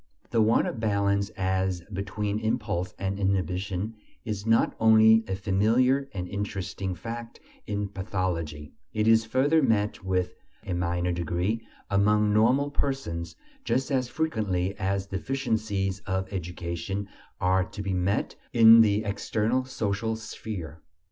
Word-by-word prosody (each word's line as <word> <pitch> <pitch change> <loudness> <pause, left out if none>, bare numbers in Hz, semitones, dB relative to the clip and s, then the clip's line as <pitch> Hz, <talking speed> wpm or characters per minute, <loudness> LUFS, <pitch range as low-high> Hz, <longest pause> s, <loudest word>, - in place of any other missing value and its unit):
The 115 - +3
want 110 +2 +4
of - - -4
balance 100 -2 +1
as 95 -1 0
between 105 +2 -2
impulse 105 -4 -2
and 100 +1 -3
inhibition 95 +1 -1 0.3
is 105 -1 -4
not 115 0 +3
only 110 0 +6
a 95 - -1
familiar 115 +9 +2
and 90 -2 -4
interesting 100 -1 -4
fact 115 +6 -7 0.3
in 105 -1 -2
pathology; 90 -7 -3 0.2
it 110 0 +1
is 110 0 +5
further 135 +7 +3
met 105 -7 +1
with, 90 -1 0 0.3
though - - -5
in 90 - -1
a - - -2
minor 90 0 0
degree, 90 +6 -1 0.3
among 105 +1 +3
normal 130 +7 +3
persons, 85 - -3 0.3
just 130 +4 0
as 130 -2 +1
frequently 100 - -1
as 95 0 -1
deficiencies 100 -2 -2
of 95 +1 -2
education 90 +2 -4 0.3
are 95 +1 +3
to 100 - -7
be 100 -1 -2
met 95 +3 0 0.2
with 120 - -2
in 115 0 +10
the 105 -1 +3
external 110 +4 0
social 110 -2 -2
sphere. 95 -8 -7
100 Hz, 140 wpm, -27 LUFS, 95-110 Hz, 0.3 s, in